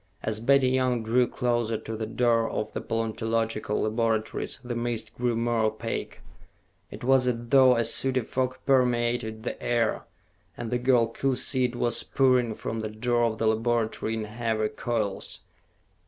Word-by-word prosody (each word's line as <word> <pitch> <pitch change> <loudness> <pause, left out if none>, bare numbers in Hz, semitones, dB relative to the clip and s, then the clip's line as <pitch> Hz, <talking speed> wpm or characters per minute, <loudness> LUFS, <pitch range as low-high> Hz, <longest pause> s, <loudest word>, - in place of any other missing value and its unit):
As 110 0 -2
Betty 130 +2 +4
Young 125 -2 +1
drew 120 +2 +2
closer 120 -3 -1
to 110 - -6
the 110 0 -4
door 115 0 +2
of 105 - -3
the - - -4
paleontological 115 -1 -1
laboratories, 110 0 -1
the 120 0 -4
mist 120 -1 -2
grew 120 -1 -1
more 115 0 0
opaque. 110 +1 -4 0.7
It - - -10
was 130 0 +3
as 125 - +2
though 130 -1 +6
a 115 0 +1
sooty 130 -1 +2
fog 130 +2 -2
permeated 120 -4 +1
the - - -5
air, 115 -2 0 0.5
and 115 - -5
the 125 - +1
girl 125 -2 +4
could 125 +3 -1
see 130 -1 +1
it 125 0 -3
was 120 -1 0
pouring 125 -4 +2
from 115 - -4
the 110 -1 -3
door 120 +2 +1
of 110 -1 -1
the 115 - -1
laboratory 110 0 0
in 110 - -3
heavy 110 0 -1
coils. 110 -5 -3
120 Hz, 165 wpm, -27 LUFS, 110-125 Hz, 0.7 s, though